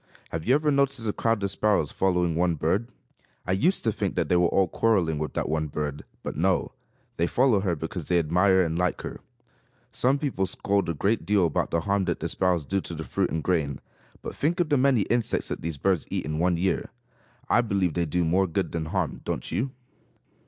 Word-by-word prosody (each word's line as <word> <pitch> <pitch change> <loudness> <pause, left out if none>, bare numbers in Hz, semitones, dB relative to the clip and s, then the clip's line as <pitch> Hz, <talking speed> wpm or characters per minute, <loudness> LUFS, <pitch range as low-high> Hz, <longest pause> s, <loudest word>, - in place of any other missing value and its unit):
Have 80 +3 -4
you 130 - +5
ever 150 0 +2
noticed 135 -4 +1
a 105 - 0
crowd 115 -3 0
of 100 - 0
sparrows 100 -7 +1
following 90 -3 +1
one 85 +1 +1
bird? 90 +9 0 0.6
I - - -2
used 160 - +2
to 110 - +2
think 105 -2 -2
that - - 0
they 90 - +3
were 90 0 +4
all 95 +2 +2
quarreling 85 -6 +1
with 75 - -4
that - - -1
one 80 0 -1
bird; 75 0 -4 0.2
but - - -4
no, 90 +4 +1 0.5
they 85 - +2
follow 125 -2 +3
her 95 -3 0
because 80 +1 -5
they 90 - +3
admire 90 +4 +3
and 80 0 -2
like 90 0 0
her. - - -7 0.7
Some 130 +3 +2
people 135 -10 -1
scold 100 +1 0
a 85 - -1
great 100 +9 0
deal 100 -3 +3
about 80 - 0
the 85 - 0
harm 100 +1 0
that 85 -2 -1
the 85 - -2
sparrows 90 -3 +1
do 95 +6 -1
to 85 - -7
the 80 - -5
fruit 95 +3 -1
and 80 -2 -2
grain. 75 -7 0 0.4
But - - -5
think 165 +5 -1
of 170 -3 +1
the 145 - +3
many 130 -4 +4
insects 120 +1 -1
that - - -4
these 80 -2 -3
birds 95 +1 0
eat - - -2
in 75 0 -3
one 90 0 +2
year! 95 +2 0 0.6
I 120 - +4
believe 100 -7 0
they 85 +1 0
do 85 +3 0
more 95 +4 +2
good 80 - -2
than 80 -2 -3
harm, 80 - -2
don't - - -4
you? 130 +5 -1
90 Hz, 225 wpm, -26 LUFS, 80-105 Hz, 0.7 s, you